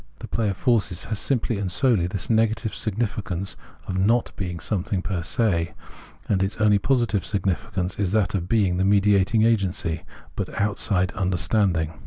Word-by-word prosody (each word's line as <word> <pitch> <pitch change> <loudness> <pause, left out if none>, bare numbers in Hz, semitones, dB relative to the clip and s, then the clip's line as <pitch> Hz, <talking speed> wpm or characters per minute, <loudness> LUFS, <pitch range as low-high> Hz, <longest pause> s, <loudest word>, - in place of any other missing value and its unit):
The - - -8
play 110 -2 0
of 95 - -3
forces 105 -8 +1
has 110 -2 -3
simply 120 -5 0
and 95 -3 -1
solely 110 - +2
this 95 0 -3
negative 115 0 +1
significance 100 -4 -2 0.3
of 95 0 -2
not 115 +5 +2
being 90 -3 -4
something 95 +1 -2
j^er 90 -4 -2
se; 85 -4 0 0.5
and 95 -3 +1
its 95 +1 -1
only 105 -2 +4
positive 120 -4 +1
significance 95 -1 -2
is 100 -3 0
that 105 -4 +1
of 90 -2 -2
being 100 -6 +2
the 95 - +1
mediating 100 +2 +3
agency, 95 -7 +1 0.3
but - - -4
outside 100 -3 +1
understanding. 90 -3 +1
100 Hz, 160 wpm, -24 LUFS, 90-110 Hz, 0.5 s, only